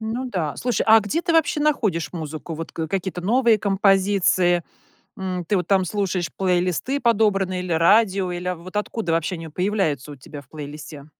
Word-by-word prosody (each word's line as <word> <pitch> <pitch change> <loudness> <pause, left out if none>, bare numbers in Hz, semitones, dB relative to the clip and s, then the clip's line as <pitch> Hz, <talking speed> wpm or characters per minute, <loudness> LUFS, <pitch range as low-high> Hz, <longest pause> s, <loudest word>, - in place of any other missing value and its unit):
Ну 225 +4 -3
да. 160 -7 -2
Слушай, 245 -1 -1
а 225 0 +7
где 285 +12 -2
ты 345 - 0
вообще 320 -2 +2
находишь 210 - 0
музыку, 160 0 -6
вот 165 +1 -7
к 160 - -3
какие-то 190 0 -3
новые 230 +3 +3
композиции? 195 -3 +2 0.6
М, 185 -2 -4
ты 205 - 0
вот 180 -2 -1
там 190 -2 +3
слушаешь 185 -2 -2
плейлисты 185 - 0
подобранные 200 -6 +1
или 180 - -5
радио, 190 +2 +3
или, 175 +1 -5
а, 180 - -2
в 170 - -15
вот 185 +3 -11
откуда 210 -3 -2
вообще 165 +3 0
они 165 -1 -8
появляются 160 - -1
у - - -8
тебя 140 +2 -10
в 130 - -25
плейлисте? 150 -1 -9
185 Hz, 190 wpm, -22 LUFS, 165-210 Hz, 0.6 s, а